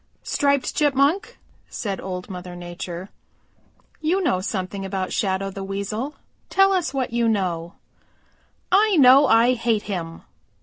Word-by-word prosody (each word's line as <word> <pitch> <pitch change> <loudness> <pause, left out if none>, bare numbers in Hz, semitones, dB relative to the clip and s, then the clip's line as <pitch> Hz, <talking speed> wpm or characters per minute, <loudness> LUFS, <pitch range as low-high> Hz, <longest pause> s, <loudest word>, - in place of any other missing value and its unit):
"Striped 280 -2 +1
Chipmunk," 290 +7 +1 0.3
said 200 -3 -4
Old 180 -1 -5
Mother 180 -2 -8
Nature, 175 +1 -7 0.9
"you 330 +5 +1
know 185 - +1
something 190 0 -4
about 190 -1 -3
Shadow 195 -1 -1
the 195 0 -6
Weasel, 200 +8 -4 0.3
tell 390 0 +4
us 355 -8 0
what 260 -3 -2
you 235 -1 +2
know." 180 -4 -2 1.0
"I 410 +2 +4
know 270 +1 +7
I 235 +2 +5
hate 230 -3 0
him!" 165 -5 -5
210 Hz, 130 wpm, -23 LUFS, 185-275 Hz, 1.0 s, know